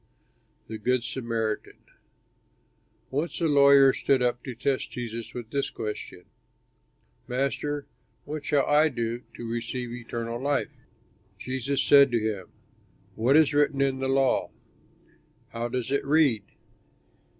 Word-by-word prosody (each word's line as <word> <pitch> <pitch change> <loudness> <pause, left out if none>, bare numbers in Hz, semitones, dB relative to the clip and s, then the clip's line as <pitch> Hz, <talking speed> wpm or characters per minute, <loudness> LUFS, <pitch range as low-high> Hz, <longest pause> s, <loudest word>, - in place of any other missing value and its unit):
'" - - -41
THE 110 -1 -6
GOOD 125 +3 +1
SAMARITAN 115 -3 -3 1.3
Once 150 +6 -2
a 170 - +1
lawyer 140 -2 +6
stood 130 -2 +1
up 120 0 0
to 130 -3 -6
test 130 +2 -1
Jesus 115 -1 -6
with 120 -2 -7
this 140 -1 -1
question, 105 -4 -6 1.0
"Master, 140 +3 -2 0.4
what 150 0 -5
shall 140 -1 +2
I 150 +2 +4
do 120 -2 -3
to 120 - -7
receive 120 +1 -4
eternal 120 0 -5
life?" 145 +1 0 0.7
Jesus 130 +2 -2
said 140 -1 +7
to 120 - +3
him, 105 -4 -3 0.7
"What 125 +6 +3
is 155 -2 +4
written 145 -1 +2
in 135 -1 +1
the 135 - -1
law? 135 -1 +2 1.0
How 115 +1 -3
does 125 +1 -3
it 140 - +1
read?" 140 -8 +3
130 Hz, 130 wpm, -27 LUFS, 115-140 Hz, 1.3 s, said